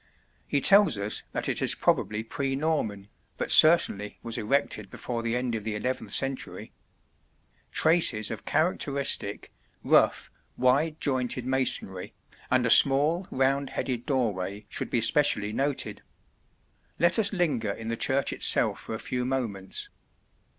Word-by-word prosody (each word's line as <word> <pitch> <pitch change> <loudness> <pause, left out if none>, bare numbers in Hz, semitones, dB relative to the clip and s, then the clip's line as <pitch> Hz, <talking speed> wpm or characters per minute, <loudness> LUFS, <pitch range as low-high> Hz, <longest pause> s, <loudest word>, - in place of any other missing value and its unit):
He 140 - -1
tells 200 - +6
us 100 +1 -2
that - - -2
it - - -2
is - - +2
probably 105 +1 -1
pre 135 +4 -4
Norman, 135 -10 -3 0.3
but - - -3
certainly 130 -11 +5
was 115 -1 -3
erected 135 +7 -2
before 120 -2 -5
the 115 0 -3
end 125 -1 -3
of 110 -2 -4
the 105 -1 -4
11th 120 -4 -5
century. 135 -1 -3 1.0
Traces 155 -10 +3
of - - -7
characteristic, 140 - -1 0.3
rough, - - +1 0.3
wide 145 +5 0
jointed 125 -2 -2
masonry 130 -8 -2 0.4
and 130 -1 +1
a 115 - +3
small, 150 +7 +5
round 135 +1 -1
headed 125 -1 -5
doorway 105 -7 -3
should - - -5
be 120 - -1
specially 110 -5 +2
noted. 140 +2 -3 1.0
Let 175 +6 +3
us 210 -2 +1
linger 150 - -2
in 110 +3 -6
the 115 - -2
church 135 +4 0
itself - - +3
for 110 - -7
a - - -7
few 125 +1 -4
moments. 115 -7 -4
130 Hz, 140 wpm, -26 LUFS, 110-140 Hz, 1.0 s, tells